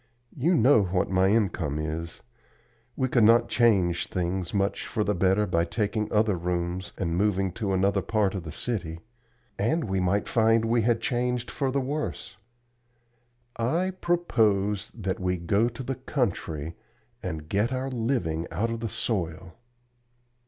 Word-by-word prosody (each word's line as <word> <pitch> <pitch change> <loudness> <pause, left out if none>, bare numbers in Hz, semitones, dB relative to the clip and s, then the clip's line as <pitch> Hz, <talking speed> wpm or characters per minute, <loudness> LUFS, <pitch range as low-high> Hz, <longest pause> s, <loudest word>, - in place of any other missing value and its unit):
You 165 +7 +2
know 130 -4 +5
what 90 -1 0
my 95 0 +3
income 95 -9 +1
is; 80 +2 -4 0.7
we 130 - 0
could 120 -3 +3
not 115 +2 +5
change 95 -8 +2
things 90 0 -2
much 100 0 -1
for 105 - -1
the 105 - +1
better 95 +3 +2
by 85 -4 +1
taking 105 +4 -2
other 105 -2 +3
rooms 90 +1 -2
and 85 -3 -1
moving 95 -1 +1
to 100 +2 -3
another 95 +1 +2
part 105 -4 +1
of 95 - -3
the 80 -2 -8
city, 85 -4 -4 0.6
and 155 +11 +1
we 95 -4 -1
might 95 +3 +1
find 115 0 +3
that - - -1
we 120 0 +3
had 115 +1 +1
changed 125 -1 -1
for 135 - -1
the 140 +2 0
worse. 135 -7 -4 1.2
I 165 +11 0
propose 110 - +1
that 95 -4 -2
we 90 -1 0
go 100 +7 +1
to 120 +2 -8
the 135 - -2
country 90 - -2 0.5
and 80 -1 -5
get 105 +8 +1
our 130 +1 -2
living 110 -10 -1
out 115 +2 -1
of 115 - -3
the 115 -1 -3
soil." 85 -6 -3
105 Hz, 160 wpm, -27 LUFS, 90-120 Hz, 1.2 s, know